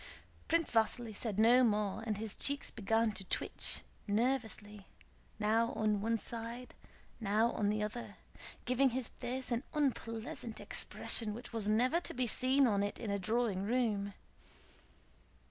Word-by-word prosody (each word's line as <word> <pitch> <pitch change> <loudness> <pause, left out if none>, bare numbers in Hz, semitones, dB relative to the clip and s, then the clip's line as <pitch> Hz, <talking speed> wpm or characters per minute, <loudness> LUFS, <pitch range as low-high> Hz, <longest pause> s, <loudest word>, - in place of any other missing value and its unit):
Prince 330 0 +2
Vasíli 225 0 +1
said 210 -2 -3
no 240 +4 +6
more 210 -3 +1
and 210 -2 0
his 215 -1 -2
cheeks 285 0 0
began 225 +2 +1
to 195 -1 -5
twitch - - -2 0.3
nervously, 210 -3 -1 0.5
now 220 +2 +2
on 210 -2 +1
one 230 +2 +1
side, 235 +3 -7 0.5
now 220 +2 +2
on 205 -1 0
the 210 0 0
other, 225 +3 -5 0.5
giving 255 +2 +3
his 250 -1 -2
face 260 +1 -4
an 235 0 +1
unpleasant 230 -5 -2
expression 215 -3 -2
which 240 +1 -9
was 215 -2 +2
never 250 +10 +3
to - - -4
be 250 0 +1
seen 260 +4 +3
on 205 -4 +2
it 205 0 -2
in 220 -4 -3
a 200 - 0
drawing 215 0 +1
room. 205 -3 0
225 Hz, 145 wpm, -35 LUFS, 210-245 Hz, 0.5 s, no